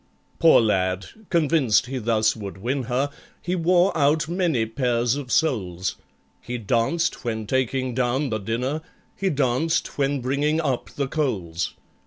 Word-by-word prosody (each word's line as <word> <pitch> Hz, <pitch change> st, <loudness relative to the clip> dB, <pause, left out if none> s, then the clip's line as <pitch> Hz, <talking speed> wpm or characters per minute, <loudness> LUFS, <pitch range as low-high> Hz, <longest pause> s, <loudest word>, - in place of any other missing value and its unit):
Poor 165 Hz, 0 st, +7 dB
lad! 95 Hz, -3 st, +1 dB, 0.2 s
convinced 155 Hz, -, +3 dB
he 130 Hz, +1 st, -4 dB
thus 110 Hz, -1 st, +2 dB
would 100 Hz, -3 st, -7 dB
win 130 Hz, +8 st, -1 dB
her, 130 Hz, +4 st, 0 dB, 0.3 s
He 180 Hz, +1 st, -2 dB
wore 180 Hz, +2 st, +3 dB
out 150 Hz, 0 st, +2 dB
many 170 Hz, -9 st, +1 dB
pairs 120 Hz, 0 st, 0 dB
of 140 Hz, -4 st, -6 dB
soles; 95 Hz, -, 0 dB, 0.5 s
He 125 Hz, +1 st, -4 dB
danced 120 Hz, -, 0 dB
when 110 Hz, -3 st, -2 dB
taking 130 Hz, +1 st, 0 dB
down 130 Hz, +2 st, 0 dB
the 110 Hz, -, -1 dB
dinner— 125 Hz, +9 st, -2 dB, 0.3 s
He 195 Hz, -, 0 dB
danced 145 Hz, +3 st, 0 dB
when 140 Hz, 0 st, +1 dB
bringing 140 Hz, +5 st, 0 dB
up 135 Hz, -6 st, -1 dB
the 140 Hz, -1 st, -3 dB
coals. 95 Hz, -, -2 dB
130 Hz, 145 wpm, -24 LUFS, 115-150 Hz, 0.5 s, Poor